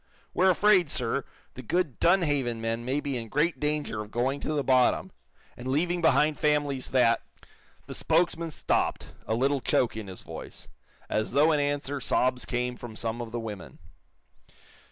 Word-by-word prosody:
We're 190 +1 +4
afraid, 185 -3 +4
sir, 125 0 -1 0.3
that 130 -3 -10
good 175 -8 0
Dunhaven 145 -10 +2
men 115 +1 -2
may 135 +4 -1
be 140 -3 -2
in 115 -2 -6
great 150 +8 +1
danger 150 -7 -1
of 105 - -8
going 130 +5 -1
to 155 - -3
the 145 -2 0
bottom, 130 -2 +3 0.4
and 125 - -8
leaving 170 +6 +1
behind 155 -2 +3
families 145 -3 0
that 120 -3 +3 0.3
" - - -32
The - - -8
spokesman 165 0 +1
stopped, 155 - -1
a 110 - +1
little 135 +3 +1
choke 120 -2 +1
in 110 -2 -6
his 95 -1 -8
voice. - - -9 0.4
As 110 0 -1
though 150 +3 +5
in 150 - +2
answer 145 -1 -1
sobs 125 0 +1
came 125 0 -2
from 120 -2 -9
some 115 +1 -3
of 115 -1 -6
the 120 - -3
women. 105 -4 -7
135 Hz, 175 wpm, -28 LUFS, 120-150 Hz, 0.4 s, though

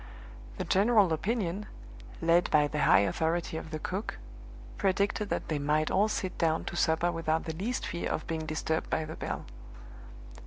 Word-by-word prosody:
The - - -2
general 200 -3 +4
opinion, 200 +2 -1 0.6
led 170 +1 +4
by 150 -1 +4
the 150 0 0
high - - +7
authority 160 +10 0
of 160 - -5
the 155 - -3
cook, 190 +7 -4 0.6
predicted 200 +2 +1
that - - -2
they 155 -2 -1
might 150 +2 +1
all 205 +3 +4
sit 190 -3 -3
down 165 -1 +1
to - - -5
supper 170 +1 +2
without 165 -1 0
the 160 - -4
least 215 +10 -2
fear 170 - -3
of - - -2
being 160 -1 -3
disturbed 160 0 -1
by 160 - 0
the 155 - -7
bell. - - -4
165 Hz, 170 wpm, -30 LUFS, 160-195 Hz, 0.6 s, high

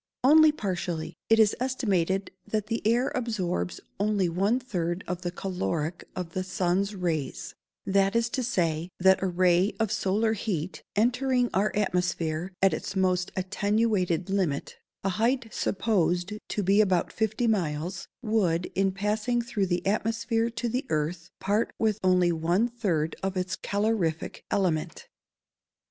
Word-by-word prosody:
_ - - +7
Only 315 +2 +8
partially. 180 - -3 0.2
It 225 - +6
is 220 -2 +5
estimated 200 -7 0 0.2
that 215 -2 -1
the 230 +1 -2
air 240 +3 +2
absorbs 200 -8 -2 0.2
only 205 -3 +1
one 200 +8 +1
third 180 -7 -3
of 180 0 -3
the 175 - -2
caloric 175 -3 -3
of 180 -3 -4
the 185 +2 -2
sun's 185 +2 0
rays 165 -6 -3 0.3
that 195 +1 +2
is 230 0 +3
to 255 - -2
say, 170 -9 0
that 190 +1 +5
a 190 - +1
ray 180 +2 +3
of 220 -3 +1
solar 215 +4 +1
heat, 185 -5 -3
entering 250 +2 +2
our 200 +1 +2
atmosphere 180 -3 -1
at 195 - +5
its 195 - -4
most 185 -1 +1
attenuated 190 -2 0
limit 180 -8 -1 0.3
(a 195 - +1
height 230 +5 0
supposed 185 -2 0 0.2
to 205 - -1
be 200 +3 +5
about 185 -4 +1
fifty 220 +2 0
miles), 180 -3 -1 0.2
would, 185 -7 +1
in 195 0 +2
passing 215 +4 0
through 230 -5 -1
the 175 0 -1
atmosphere 225 +3 0
to 235 +1 -3
the 250 +3 -1
earth, 160 +2 -2
part 205 +3 0
with 220 -2 +1
only 180 -1 +4
one 170 +7 +1
third 185 -10 -1
of 190 0 -2
its 180 0 -1
calorific 200 -6 -1
element. 180 -6 -1
195 Hz, 150 wpm, -27 LUFS, 175-220 Hz, 0.3 s, Only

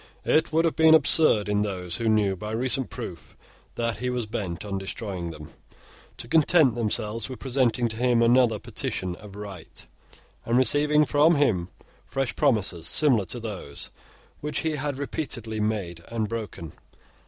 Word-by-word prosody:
It 160 +1 +2
would 165 +1 +2
have 165 - 0
been 160 0 +7
absurd 155 -9 +4
in 105 0 +1
those 90 -4 -3
who 115 -2 0
knew, 105 -3 +2
by 105 +4 -7
recent 130 +2 -1
proof, - - -9 0.4
that 115 -3 -2
he 125 +3 -2
was 125 -2 -2
bent 100 -4 -5
on 100 -1 -3
destroying 95 -3 -5
them, 75 -2 -9 0.7
to - - -6
content 155 -2 +4
themselves 110 0 -1
with 130 - -6
presenting 125 -2 +1
to 110 - -6
him 120 -1 +3
another 120 -2 +4
Petition 90 -2 -4
of 100 -1 -12
Right, 100 -4 -10 0.6
and 120 +1 +1
receiving 150 +4 +4
from 150 +5 +4
him 100 -12 +1 0.3
fresh 135 -1 -3
promises 105 - +1
similar 125 - +3
to 120 - -5
those 95 -11 -6 0.5
which 150 +1 -3
he 160 -2 -1
had 145 -1 -3
repeatedly 120 -6 -4
made 100 -6 -2
and 115 -2 -2
broken. 105 -8 -6
115 Hz, 160 wpm, -25 LUFS, 100-135 Hz, 0.7 s, been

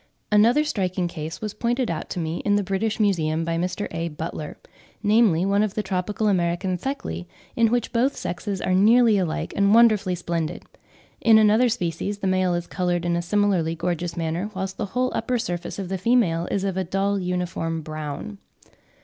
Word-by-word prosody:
Another 230 +8 +5
striking 185 -9 -1
case 160 -1 -6
was 210 -1 -4
pointed 240 -1 -1
out 160 - -5
to - - -4
me 160 0 -2
in 205 -1 +1
the 205 - +1
British 200 +4 -1
Museum 165 -6 +1
by 165 0 -1
Mr. 180 +4 -2
A. 165 +1 -2
Butler, 155 -1 -6 0.5
namely, 205 -5 +4
one 200 +1 +2
of 215 -2 -1
the 215 - -1
tropical 195 +3 -1
American 180 -1 +1
Theclae, 165 - -4 0.3
in 230 -1 +4
which 240 +1 -1
both 250 +4 +2
sexes 190 +2 -4
are 185 - +1
nearly 220 +2 +5
alike 170 -4 -2
and 200 +1 +4
wonderfully 215 -6 +4
splendid; 170 -1 -3 0.6
in 225 -1 +6
another 220 +3 +5
species 195 -1 -2
the 200 - -5
male 185 -1 +2
is 175 0 -3
coloured 175 -1 -1
in 170 0 +1
a 170 - 0
similarly 180 -3 +1
gorgeous 170 0 -3
manner, 170 +4 -2
whilst 190 0 -4
the 215 - -2
whole 255 0 +1
upper 250 -1 -1
surface 175 -6 -4
of 195 -2 -4
the 190 -1 -2
female 185 -7 +2
is 195 - -1
of 195 -2 -2
a 190 - +1
dull 195 +3 0
uniform 180 -3 -2
brown. 155 +7 -6
185 Hz, 185 wpm, -24 LUFS, 170-210 Hz, 0.6 s, in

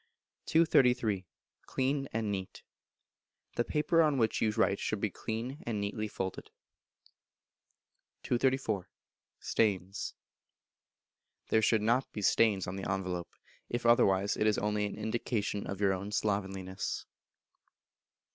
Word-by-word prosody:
233. 125 - +3 0.4
Clean 135 +1 0
and 110 -2 -1
Neat. 95 -2 -5 0.9
The 120 - +2
paper 155 +5 +2
on 150 -3 +3
which 110 -3 +1
you 110 - +3
write 100 -2 +2
should 110 - -2
be 105 -1 -1
clean, 115 - -4
and 110 -3 -1
neatly 105 +1 -2
folded. 95 -2 -5 1.7
234. 120 -6 0 0.5
Stains. 100 -2 0 1.3
There 110 - +4
should 110 -1 +3
not 120 +4 +2
be 105 - -5
stains 105 -2 +3
on 90 +2 -5
the 95 - -3
envelope; 90 -2 -2 0.4
if 120 0 -3
otherwise, 100 -4 +4
it 105 - +1
is 105 - +3
only 105 0 0
an - - -7
indication 110 -2 -2
of 100 - -4
your 100 -2 +3
own 100 +2 -4
slovenliness. 95 -3 -2
105 Hz, 120 wpm, -32 LUFS, 100-120 Hz, 1.7 s, There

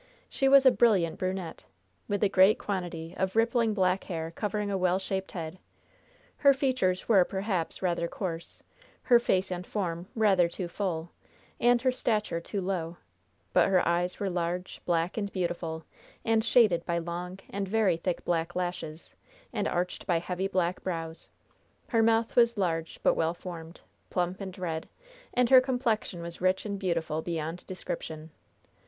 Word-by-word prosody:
She 270 -1 +2
was 275 0 +7
a 260 - +9
brilliant 195 -10 +3
brunette, 185 -2 -3 0.4
with 205 0 -1
a - - +6
great 195 +1 +5
quantity 175 -4 -4
of 190 +1 -1
rippling 230 -1 +2
black 185 -1 +1
hair 165 -3 -4
covering 210 +2 -2
a 195 - 0
well 180 0 +2
shaped 190 0 -3
head. 165 0 -6 0.8
Her 280 -2 +5
features 255 -9 0
were, 200 -5 +6
perhaps, 190 -2 -2
rather 170 -2 0
coarse, 170 -3 -6 0.4
her 240 -2 +6
face 190 -5 +1
and 180 0 -3
form 180 -3 -3
rather 195 -6 +4
too 175 +1 -5
full, 170 -3 -3 0.5
and 240 0 +4
her 260 - +4
stature 215 -8 0
too 200 +3 -4
low, 175 -3 -3 0.6
but - - +5
her 185 -2 +3
eyes 175 +1 0
were 200 - -1
large, 180 0 -3
black 170 +2 0
and 200 -2 -2
beautiful, 170 -3 -3 0.4
and 225 -1 +3
shaded 215 -8 +4
by 170 -1 -1
long 175 +2 -4
and 200 0 -2
very 205 -3 +2
thick 175 +1 -3
black 165 0 -1
lashes, 175 -3 -4 0.4
and - - 0
arched 180 +2 -2
by 175 -3 +3
heavy 180 +3 -2
black 180 -2 0
brows; 165 -3 -5 0.6
her 230 -3 +3
mouth 225 0 +2
was 235 -1 +4
large 165 -4 -1
but - - +5
well 165 +1 0
formed, 170 -2 -9 0.3
plump 180 +2 -1
and 190 0 -6
red, 165 -3 -4 0.5
and 250 0 +3
her 260 -1 +10
complexion 240 -9 -1
was 170 0 -6
rich 185 +2 +2
and 200 -2 -3
beautiful 165 -4 -1
beyond 165 0 -4
description. 160 -3 -6
185 Hz, 160 wpm, -29 LUFS, 170-210 Hz, 0.8 s, her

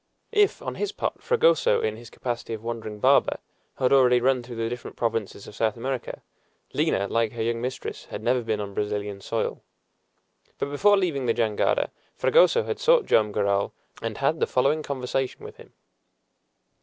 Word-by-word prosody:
If, 420 -2 +2
on - - -3
his 415 -1 0
part, - - -3
Fragoso, 485 0 +3
in 450 - -1
his 120 - -12
capacity 120 -2 -4
of 110 - -11
wandering 115 -2 -5
barber, - - +4 0.4
had 130 0 +2
already 125 -2 +5
run 130 +1 +2
through 120 0 -9
the 115 0 -1
different 120 +1 -7
provinces 115 -4 -2
of - - -11
South 110 +1 0
America, 130 +1 -4 0.5
Lina, 100 - +1
like 115 +1 0
her 115 -1 -3
young 115 0 -1
mistress, 125 +1 -5
had 105 - -7
never 125 +2 +2
been 110 -2 -2
on 100 -1 -5
Brazilian 105 -1 -3
soil. 115 +3 -2 1.0
But 140 - -3
before 205 +8 +4
leaving 155 -9 0
the 115 - +2
jangada 110 -3 +1 0.3
Fragoso 480 -1 +4
had - - -4
sought - - +4
Joam 105 -1 +3
Garral, 100 -1 0 0.3
and - - -4
had - - +1
the - - +1
following 140 +5 +2
conversation 135 -2 -3
with - - -10
him. - - -15
120 Hz, 175 wpm, -25 LUFS, 110-140 Hz, 1.0 s, already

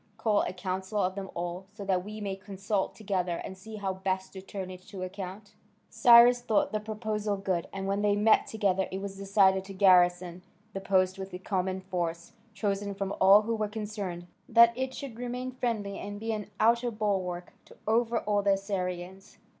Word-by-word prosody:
call 220 -2 +2
a - - -2
council 190 +2 -4
of 185 -1 +1
them 195 -1 -6
all, 175 +2 -4
so 205 -2 -7
that 185 -2 +1
we 215 +2 -7
may 200 -2 -3
consult 195 +1 -3
together, 185 -5 -2
and 190 - -7
see 220 +4 -10
how 195 -2 -2
best 190 0 -3
to 190 - -8
turn 190 -1 -6
it 185 0 -10
to 190 -1 -8
account." 195 +2 -7 0.4
Cyrus 240 0 +7
thought 220 -3 +1
the 215 - -1
proposal 210 -1 -3
good, 190 -3 -2
and 195 0 -5
when 195 +1 0
they 205 -1 +3
met 210 +2 +4
together 195 -4 0
it 190 - -4
was 195 0 -6
decided 195 -1 +3
to 195 - -8
garrison 180 -2 +4 0.3
the 195 - -4
post 190 0 +1
with 190 0 -6
a - - -4
common 190 0 -2
force, 170 -3 -3 0.2
chosen 200 0 -2
from 195 0 -3
all 195 +3 +8
who 230 +1 -1
were 215 -1 -1
concerned 205 -5 -5 0.2
that 235 0 +7
it 260 +1 -3
should 255 -5 -7
remain 250 +1 -4
friendly 225 -6 -3
and 205 0 -6
be 225 +1 -3
an 210 -2 -4
outer 235 +2 +3
balwark 190 -5 -2
to - - -17
overawe 225 -2 +1
the 200 0 +3
Assyrians. 190 -1 -4
195 Hz, 190 wpm, -29 LUFS, 190-215 Hz, 0.4 s, all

